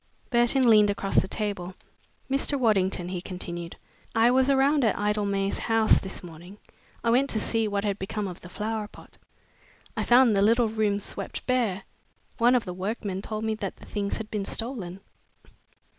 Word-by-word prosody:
Burton 240 +2 +3
leaned 210 -2 +6
across 200 -1 -2
the - - -5
table. 190 -3 -4 0.5
"Mr. 275 +1 0
Waddington," 190 -6 +1
he 180 -1 -4
continued, 175 -2 -6 0.4
"I 230 +2 +5
was 260 +1 +3
around 275 +1 +3
at 220 - +2
Idlemay 200 -1 0
House 225 -1 +3
this 190 -1 -6
morning. 175 +3 -11 0.5
I 230 - +2
went 270 +4 +3
to 220 - +1
see 225 +1 0
what 200 -1 -1
had 205 -1 -1
become 200 +2 -3
of 180 -2 -8
the 175 - -11
flower 215 +2 -3
pot. - - -17 0.8
I - - -1
found 240 -2 +5
the 195 - +3
little 230 +2 +4
room 215 -2 0
swept 200 -1 -5
bare. 230 -7 0 0.6
One 240 +2 +5
of 245 - +1
the 180 - -5
workmen 195 +1 -3
told 215 +1 -4
me 220 0 0
that 205 -3 -5
the - - -15
things 200 -1 -3
had 220 -1 -7
been 210 -2 -2
stolen." 195 -5 -3
210 Hz, 175 wpm, -26 LUFS, 195-230 Hz, 0.8 s, leaned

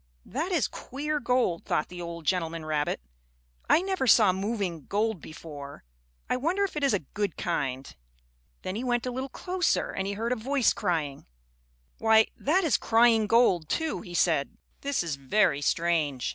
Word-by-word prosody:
"That 325 +7 -3
is 335 -7 +2
queer 300 +3 -4
gold," 250 -11 +1
thought 150 - -1
the 180 0 -8
old 170 -1 -7
gentleman 165 -3 -1
rabbit. 150 - -1 0.7
"I 345 - +5
never 380 -8 -1
saw 215 -5 +6
moving 190 - -3
gold 210 -3 0
before. 145 -3 -10 0.4
I - - 0
wonder 340 +10 0
if 395 - -2
it 300 - -2
is 275 -6 +3
a 180 - -4
good 205 -4 -2
kind." 135 -6 -3 0.7
Then 185 - -3
he 230 - -3
went 240 -1 0
a 250 - -2
little 260 +2 -4
closer 365 +5 -1
and 190 - -3
he 200 - -2
heard 225 +4 -2
a - - +2
voice 255 +2 +1
crying. 160 -8 -2 0.7
"Why, 220 0 +5
that 355 +7 +1
is 320 - +3
crying 225 -1 +4
gold, 190 -9 +3
too," 320 - -1
he 175 -4 -9
said. 160 -6 +1 0.2
"This 280 -8 0
is 160 -5 -3
very 145 +1 +2
strange." 155 -5 0
210 Hz, 175 wpm, -28 LUFS, 165-255 Hz, 0.7 s, saw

